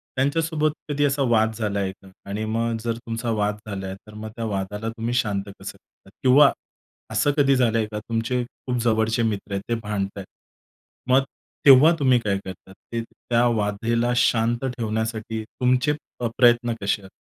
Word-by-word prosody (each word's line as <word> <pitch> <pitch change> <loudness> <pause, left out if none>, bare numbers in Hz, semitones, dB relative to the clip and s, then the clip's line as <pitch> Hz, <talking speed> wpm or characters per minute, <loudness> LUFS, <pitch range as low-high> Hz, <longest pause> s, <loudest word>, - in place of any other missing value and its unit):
त्यांच्यासोबत 155 +3 +1 0.2
कधी 145 0 +1
असा 140 0 0
वाद 110 -1 +3
झाला 105 -3 -1
आहे 95 -1 -1
का? 95 0 -19 0.2
आणि 105 +2 -3
मग 115 +1 -1
जर 115 -1 -1
तुमचा 115 0 -4
वाद 105 -1 0
झाला 95 -2 -5
आहे, 95 - -5
तर 105 - -13
मग 110 +1 -7
त्या 115 -1 -4
वादाला 105 +2 -3
तुम्ही 115 +1 -3
शांत 105 -5 0 0.2
कसं - - -6
करतात? 95 - -25
किंवा 140 +2 +7 0.6
असं 110 +7 +2
कधी 135 -1 +4
झालंय 115 -3 +2
का, 105 - -3
तुमचे 115 +3 -1
खूप 125 0 -5
जवळचे 110 0 +2
मित्र 105 -2 -2
आहेत, 100 - -1
ते 120 - +2
भांडतायेत, 100 -2 -3 0.8
मग 135 +1 +5 0.4
तेव्हा 140 +4 +9
तुम्ही 130 -3 +4
काय 100 -3 0
करतात? 95 +1 -10 0.2
ते, 115 -1 -1
त्या 120 +1 -1
वादाला 115 +4 0
शांत 120 +1 +2
ठेवण्यासाठी, 110 -2 -3
तुमचे 125 +5 +1 0.3
अ, 120 - +1
प्रयत्न 120 -1 +4
कसे 100 +1 0
आ 95 - -11
115 Hz, 170 wpm, -23 LUFS, 105-125 Hz, 0.8 s, तेव्हा